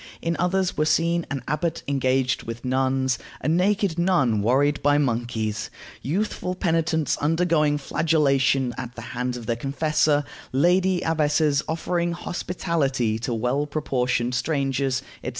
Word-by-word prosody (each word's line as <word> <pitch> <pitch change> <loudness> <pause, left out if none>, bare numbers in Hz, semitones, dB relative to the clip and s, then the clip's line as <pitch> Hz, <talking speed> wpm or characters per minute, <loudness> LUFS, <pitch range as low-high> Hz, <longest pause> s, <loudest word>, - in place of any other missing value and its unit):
In 170 0 -1
others 185 +1 +1
were 155 - +1
seen 170 +2 +1
an 135 -3 -4
abbot 160 +2 -2
engaged 130 -2 +1
with 115 +2 -7
nuns, 130 -1 +1 0.2
a - - -4
naked 180 +1 +1
nun 140 - +2
worried 140 +7 +2
by 145 0 +3
monkeys, 115 -5 -1 0.3
youthful 180 +3 -2
penitents 160 -4 0
undergoing 155 -1 +2
flagellation 140 -4 +1
at 125 -1 -6
the 120 - -8
hands 125 0 -2
of 120 - -8
their 115 - 0
confessor, 145 +2 +1 0.3
lady 180 +6 +2
abbesses 150 -2 +2
offering 170 +1 -1
hospitality 150 -10 -1
to 115 +2 -3
well 125 +6 0
proportioned 125 -5 -1
strangers, 135 -1 0 0.2
etc. - - -2
145 Hz, 135 wpm, -24 LUFS, 130-165 Hz, 0.3 s, by